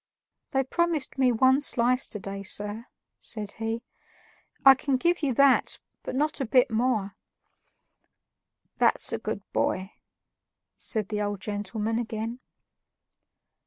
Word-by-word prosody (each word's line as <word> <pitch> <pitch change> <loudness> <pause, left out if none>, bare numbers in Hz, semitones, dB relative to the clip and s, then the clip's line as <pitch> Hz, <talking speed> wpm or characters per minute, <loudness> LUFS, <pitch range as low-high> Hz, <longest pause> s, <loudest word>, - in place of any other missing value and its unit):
"They 270 -2 +1
promised 315 -1 0
me 255 -2 +4
one 260 +4 +4
slice 250 -2 +3
to - - -6
day, 195 0 -6
sir," 205 +4 -2 0.3
said 210 -3 -5
he; 225 +1 -3 0.8
"I 270 - +11
can 270 0 -1
give 345 +6 +1
you 285 -3 +1
that, 275 0 +4 0.2
but - - -6
not 300 +1 0
a - - 0
bit 250 0 +3
more." 220 -4 0 1.6
"That's - - +2
a - - -1
good - - -4
boy," 190 +2 -1 0.8
said 215 -4 0
the 210 -1 -2
old 205 -1 -2
gentleman 210 +3 -3
again. 230 +1 -4
235 Hz, 125 wpm, -27 LUFS, 210-265 Hz, 1.6 s, I